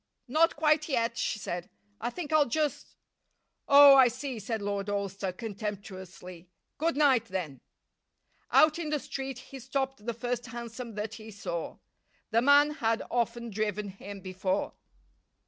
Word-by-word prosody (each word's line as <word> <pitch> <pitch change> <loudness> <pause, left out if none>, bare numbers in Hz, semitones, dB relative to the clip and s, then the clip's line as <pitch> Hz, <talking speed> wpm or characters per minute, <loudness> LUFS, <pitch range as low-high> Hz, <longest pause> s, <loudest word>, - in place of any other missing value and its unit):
"Not 315 +6 +3
quite 305 0 +2
yet," 235 -3 0
she 230 - -1
said. 175 -3 -5 0.3
"I - - -2
think 315 +2 -5
I'll 305 -2 +5
just 300 +4 -2 0.3
" - - -48 0.3
"Oh! 280 0 +9
I 260 -2 +8
see," 255 0 -4
said 220 +2 -3
Lord 200 0 -3
Alcester, 200 -1 -2
contemptuously. 190 -4 -7 0.3
"Good 325 -1 0
night, 265 -6 +4
then." 175 - -5 0.9
Out 310 +1 +5
in 320 -3 -3
the 300 - +1
street 270 -2 -5
he 265 +1 -10
stopped 265 -2 -3
the 235 - -1
first 245 +1 -3
hansom 235 -1 -7
that 210 +1 -4
he 220 -1 -10
saw. 170 -5 -5 0.5
The 230 - +4
man 285 +3 +6
had 230 -6 0
often 235 -1 -1
driven 210 0 -2
him 195 +1 -9
before. 185 +1 -2
230 Hz, 150 wpm, -29 LUFS, 200-275 Hz, 0.9 s, Oh